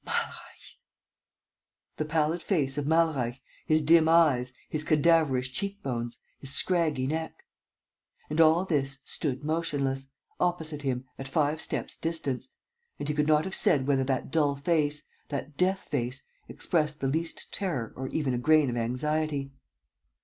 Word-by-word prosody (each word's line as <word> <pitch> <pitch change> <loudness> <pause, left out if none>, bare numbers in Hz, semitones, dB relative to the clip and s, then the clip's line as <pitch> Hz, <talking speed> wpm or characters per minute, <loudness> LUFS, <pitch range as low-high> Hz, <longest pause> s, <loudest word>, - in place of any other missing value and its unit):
Malreich! - - -5 1.2
The 155 - -1
pallid 155 +2 +1
face 140 -9 0
of 145 - -3
Malreich, 150 -7 +2 0.3
his 155 -1 +3
dim 160 +1 +6
eyes, 145 -7 +4 0.2
his 155 0 -1
cadaverous 155 -4 +3
cheek 200 +9 -4
bones, 120 -2 -3 0.2
his 135 - -3
scraggy 155 -4 +2
neck.... 160 +3 -3 0.8
And 155 +2 +2
all 165 +3 +5
this 140 -5 -1
stood 140 -2 -2
motionless, 145 -4 -1 0.3
opposite 160 -4 -1
him, 130 -2 -2
at 135 - -5
five 150 +3 +1
steps' - - -3
distance; 160 - -3 0.5
and 145 - -4
he - - +1
could 150 0 +1
not 155 +1 +4
have 190 - -5
said 135 -7 +2
whether 135 -1 +2
that 130 0 -1
dull 145 -3 +2
face, 150 0 0 0.3
that 145 0 -4
death 190 +4 +1
face, 125 -1 -3 0.2
expressed 150 -3 0
the 135 - 0
least 165 +4 -3
terror 165 - -2
or 130 +1 -4
even 140 -2 -1
a 120 - 0
grain 155 0 +4
of 120 - -3
anxiety. 140 +4 -1
150 Hz, 150 wpm, -28 LUFS, 135-160 Hz, 1.2 s, dim